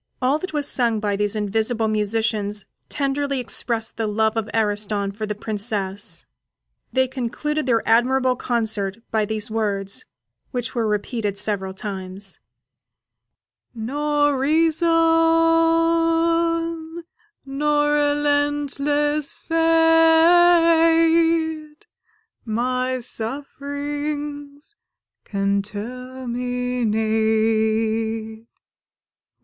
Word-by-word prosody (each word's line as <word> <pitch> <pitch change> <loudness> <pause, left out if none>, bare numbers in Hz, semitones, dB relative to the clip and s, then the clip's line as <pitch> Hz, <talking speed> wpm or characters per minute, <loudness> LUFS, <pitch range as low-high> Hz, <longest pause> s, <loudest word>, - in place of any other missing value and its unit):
All 270 +4 +1
that 375 +3 -6
was 295 -2 -1
sung 235 -4 +1
by 205 -1 -1
these 205 +1 -1
invisible 220 +2 0
musicians 210 -1 -1 0.2
tenderly 280 -1 -1
expressed 230 -2 -1
the 225 -1 -1
love 220 +1 +1
of 225 -1 -2
Ariston 205 -2 0
for 215 +2 -5
the 210 - -3
Princess; 205 -2 -3 0.7
they 260 0 +2
concluded 265 +4 -3
their 230 -3 +1
admirable 255 +3 +3
concert 220 -5 -2
by 220 -2 +1
these 220 +1 -4
words, 200 -3 -2 0.4
which 245 -2 -4
were 235 -3 0
repeated 210 0 -2
several 195 -2 -2
times: 195 -1 -3 1.4
Nor 290 +4 0
reason 320 +4 +2 2.6
nor 295 +2 +1
relentless 290 0 +1
Fate 325 0 +4 0.6
My 255 +3 -1
sufferings 285 - -5 0.5
can 200 0 0
terminate! 225 -2 -1
245 Hz, 80 wpm, -22 LUFS, 215-290 Hz, 2.6 s, Fate